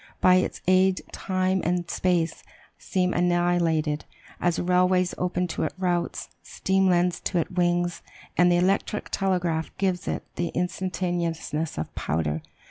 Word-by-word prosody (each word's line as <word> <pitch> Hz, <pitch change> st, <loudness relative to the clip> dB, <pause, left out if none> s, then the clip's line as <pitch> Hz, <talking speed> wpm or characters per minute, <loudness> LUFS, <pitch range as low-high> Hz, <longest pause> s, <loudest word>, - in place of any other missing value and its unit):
By 185 Hz, 0 st, +6 dB
its 185 Hz, -, -1 dB
aid 185 Hz, 0 st, +4 dB
time 185 Hz, 0 st, 0 dB
and 175 Hz, 0 st, 0 dB
space 175 Hz, -3 st, 0 dB, 0.4 s
seem 180 Hz, -3 st, 0 dB
annihilated, 175 Hz, -4 st, +1 dB, 0.3 s
as 175 Hz, -1 st, +1 dB
"railways 180 Hz, 0 st, +2 dB
open 180 Hz, 0 st, 0 dB
to -, -, -3 dB
it -, -, -1 dB
routes, 175 Hz, -2 st, -1 dB
steam 190 Hz, 0 st, +1 dB
lends 175 Hz, 0 st, +2 dB
to 180 Hz, -, -2 dB
it 165 Hz, -, 0 dB
wings, 175 Hz, -1 st, +1 dB, 0.3 s
and 175 Hz, 0 st, +5 dB
the 175 Hz, -, +4 dB
electric 195 Hz, +3 st, 0 dB
telegraph 180 Hz, -4 st, 0 dB
gives 185 Hz, -2 st, -1 dB
it -, -, -2 dB
the 175 Hz, -, 0 dB
instantaneousness 175 Hz, -3 st, -2 dB
of 80 Hz, -, -4 dB
powder!" 80 Hz, 0 st, -1 dB
180 Hz, 135 wpm, -26 LUFS, 170-185 Hz, 0.4 s, By